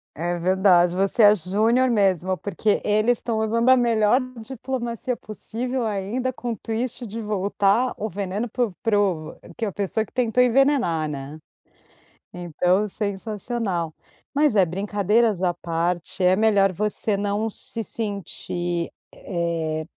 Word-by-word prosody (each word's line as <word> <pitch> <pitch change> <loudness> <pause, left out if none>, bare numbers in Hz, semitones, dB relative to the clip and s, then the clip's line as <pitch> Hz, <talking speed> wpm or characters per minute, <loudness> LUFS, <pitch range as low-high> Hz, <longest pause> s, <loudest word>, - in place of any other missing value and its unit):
É 175 +3 -2
verdade. 180 -1 +4
Você 195 +4 +1
é 205 +1 +8
júnior 220 +8 +2
mesmo, 190 -4 +2
porque 205 +1 0
eles 215 +3 +2
estão 230 -2 -2
usando 230 +3 +1
a 260 - +7
melhor 230 0 +3 0.2
diplomacia 245 -1 -4
possível 235 +4 -4
ainda 220 +5 -2
com 245 -1 -4
o 225 - -4
twist 235 +2 -4
de 225 +2 -6
voltar 205 +3 +1
o 215 +1 -4
veneno 200 +4 -3
para 245 +2 +1
o - - -10
para 225 -4 +2
o 170 -6 -1 0.2
que 225 - -2
a 200 - -2
pessoa 205 +3 -1
que - - -24
tentou 250 0 +2
envenenar, 245 - +2
né. 140 +1 -6 1.0
Então, 180 +3 0
sensacional. 200 -4 -3 0.4
Mas 290 -5 +3
é, 190 -2 +5
brincadeiras 205 +2 +1
à 175 -1 +2
parte, 175 +2 -2
é 185 +1 +5
melhor 200 -2 +3
você 210 +2 0
não 205 +2 -1
se 225 +2 -4
sentir, 175 -5 -3 0.2
eh, 165 -3 -3
205 Hz, 140 wpm, -23 LUFS, 180-230 Hz, 1.0 s, é